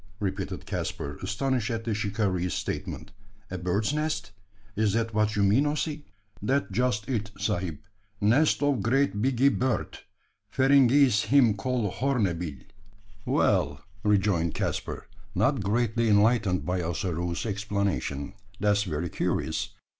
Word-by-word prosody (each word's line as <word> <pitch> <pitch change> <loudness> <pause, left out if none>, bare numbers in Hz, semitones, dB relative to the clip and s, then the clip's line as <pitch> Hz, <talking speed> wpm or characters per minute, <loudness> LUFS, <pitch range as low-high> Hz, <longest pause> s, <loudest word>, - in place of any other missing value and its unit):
repeated 95 -1 -3
Caspar, 70 +1 -4
astonished 125 +2 -1
at 115 -1 -2
the 115 -1 -1
shikaree's 100 -4 -1
statement. 100 - -4 0.4
"A 95 - -3
bird's 100 +8 0
nest? 150 -7 -2 0.4
Is 105 -1 +1
that 115 0 0
what 110 0 +1
you 100 - +2
mean, 110 +9 +4
Ossy?" 150 0 -2 0.3
"That 135 +3 0
just 110 0 0
it, 110 -6 -2
sahib. 95 -6 -2 0.4
Nest 135 +9 +3
of 145 -3 +2
great 130 -3 +1
biggee 135 +2 +3
bird. 130 -1 -1 0.5
Feringhees 135 -3 +4
him 130 -6 +5
call 105 0 -1
horneebill." 90 - -1 0.6
"Well," 70 +1 +1 0.2
rejoined 95 -5 +2
Caspar, - - -3 0.3
not 115 +7 +2
greatly 115 +2 +1
enlightened 105 -3 +3
by 90 0 -1
Ossaroo's 85 +1 -2
explanation, 100 -7 -2 0.3
"that's 105 0 +3
very 85 -4 -2
curious. - - -1
105 Hz, 125 wpm, -27 LUFS, 95-125 Hz, 0.6 s, him